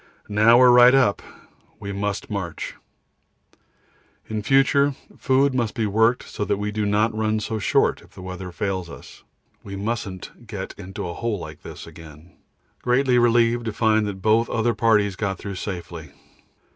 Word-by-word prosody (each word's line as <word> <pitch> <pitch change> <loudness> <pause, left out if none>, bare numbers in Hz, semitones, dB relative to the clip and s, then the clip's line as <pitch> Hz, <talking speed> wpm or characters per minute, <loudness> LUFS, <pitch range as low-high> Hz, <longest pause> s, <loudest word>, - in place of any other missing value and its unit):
Now 110 +3 +5
we 130 - +6
are 125 - +7
right 125 +1 +7
up, 125 -7 +3 0.6
we 100 -2 -6
must 100 0 -3
march. 95 -6 -4 1.5
In 110 -1 -3
future 135 +4 +3 0.2
food 135 +1 +2
must 120 -4 -1
be 115 - 0
worked 110 +4 +2
so - - -4
that 100 - -1
we 105 +1 -3
do 105 0 -1
not 105 +2 +1
run 110 0 0
so 110 +1 -3
short - - +1
if - - -19
the 95 - -12
weather 90 0 -7
fails 95 -2 -3
us. - - -13 0.4
We 100 - -7
mustn't 105 +1 -5
get 100 -4 -6
into 95 -1 -7
a 85 - -5
hole 115 +4 -2
like - - -9
this - - -10
again. 80 +1 -14 0.5
Greatly 125 0 +2
relieved 120 0 +3
to 110 - -3
find 110 -1 +2
that 95 -2 -6
both 110 +2 +3
the - - -6
other 115 +1 +1
parties 105 -5 +2
got 95 -2 -2
through 100 +1 -6
safely. 85 -5 -6
105 Hz, 170 wpm, -23 LUFS, 95-115 Hz, 1.5 s, are